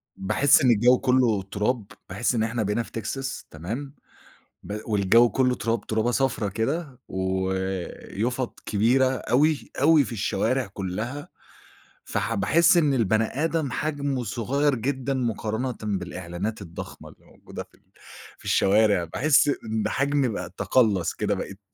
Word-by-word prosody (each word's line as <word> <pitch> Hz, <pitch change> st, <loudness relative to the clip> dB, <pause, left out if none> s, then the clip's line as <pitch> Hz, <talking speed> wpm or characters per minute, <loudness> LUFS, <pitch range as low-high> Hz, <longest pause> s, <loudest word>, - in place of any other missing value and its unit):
باحس 105 Hz, +8 st, +3 dB
إن 125 Hz, -2 st, +5 dB
الجو 120 Hz, +3 st, +5 dB
كلّه 125 Hz, -6 st, +2 dB
تُراب، 105 Hz, +1 st, -1 dB, 0.2 s
باحس 100 Hz, +7 st, 0 dB
إن 110 Hz, -, +1 dB
إحنا 115 Hz, 0 st, -1 dB
بقينا 105 Hz, +4 st, 0 dB
في -, -, -15 dB
تكساس، 135 Hz, +5 st, -4 dB
تمام، 115 Hz, -, -6 dB, 0.7 s
ب 105 Hz, +1 st, -5 dB
والجو 110 Hz, +3 st, +4 dB
كلّه 125 Hz, -1 st, +1 dB
تُراب، 115 Hz, +1 st, -2 dB
تُرابة 110 Hz, +2 st, 0 dB
صفرا 125 Hz, -5 st, 0 dB
كده 130 Hz, -, -3 dB
ويُفط 95 Hz, +6 st, -3 dB
كبيرة 120 Hz, +6 st, +3 dB
أوي، 135 Hz, +3 st, +1 dB
أوي 155 Hz, 0 st, +6 dB
في -, -, -7 dB
الشوارع 125 Hz, +3 st, 0 dB
كلّها، 110 Hz, +9 st, -5 dB, 0.8 s
فح -, -, -2 dB
باحس 165 Hz, -, +4 dB
إن 150 Hz, -4 st, +3 dB
البَني 110 Hz, -2 st, +2 dB, 0.2 s
آدم 160 Hz, -5 st, 0 dB
حجمه 140 Hz, -2 st, -2 dB
صغيّر 135 Hz, +5 st, 0 dB
جدًا 130 Hz, +3 st, -2 dB
مقارنةً 120 Hz, 0 st, -2 dB
بالإعلانات 95 Hz, +1 st, -4 dB
الضخمة 85 Hz, -3 st, -9 dB
اللي -, -, -20 dB
موجودة -, -, -10 dB
في -, -, -27 dB
ال -, -, -34 dB, 0.5 s
في -, -, -19 dB
الشوارع، 100 Hz, -2 st, +3 dB
باحس 135 Hz, -, +3 dB
إن 110 Hz, -6 st, -1 dB
حجمي 140 Hz, -1 st, +1 dB
بقى 100 Hz, -6 st, -4 dB
تقلّص 105 Hz, -9 st, +2 dB
كده -, -, -1 dB
بقيت 100 Hz, +1 st, -6 dB
115 Hz, 140 wpm, -25 LUFS, 100-135 Hz, 0.8 s, أوي